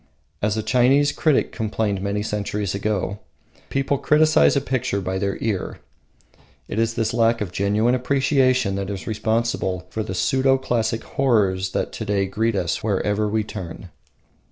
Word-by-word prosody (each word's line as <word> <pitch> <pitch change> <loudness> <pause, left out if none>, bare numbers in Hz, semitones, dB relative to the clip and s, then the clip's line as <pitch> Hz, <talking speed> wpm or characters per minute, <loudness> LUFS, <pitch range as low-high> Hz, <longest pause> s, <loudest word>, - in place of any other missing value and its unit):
As 105 +1 0
a 110 - -1
Chinese 130 +6 +3
critic 155 -2 +1
complained 105 -3 -2
many 100 +1 -1
centuries 105 -2 -2
ago, 100 -1 -2 0.5
"People 135 0 0
criticise 155 0 +4
a - - +4
picture 130 -6 -1
by 95 0 -3
their 100 0 -1
ear." 105 -5 -2 0.9
It - - -3
is 115 0 0
this 110 -1 0
lack 115 0 +3
of 100 -4 -3
genuine 105 +5 +1
appreciation 130 -3 +2
that 100 0 -3
is 100 -2 -5
responsible 110 -4 -1
for 110 - -2
the 95 -3 -4
pseudo 135 +5 +2
classic 115 -3 -1
horrors 100 -8 +1
that - - -1
to - - -5
day 100 -2 +1
greet 110 +3 -1
us 90 +2 -1
wherever 105 0 0
we 110 +1 0
turn. 95 -3 -8
110 Hz, 155 wpm, -22 LUFS, 100-125 Hz, 0.9 s, criticise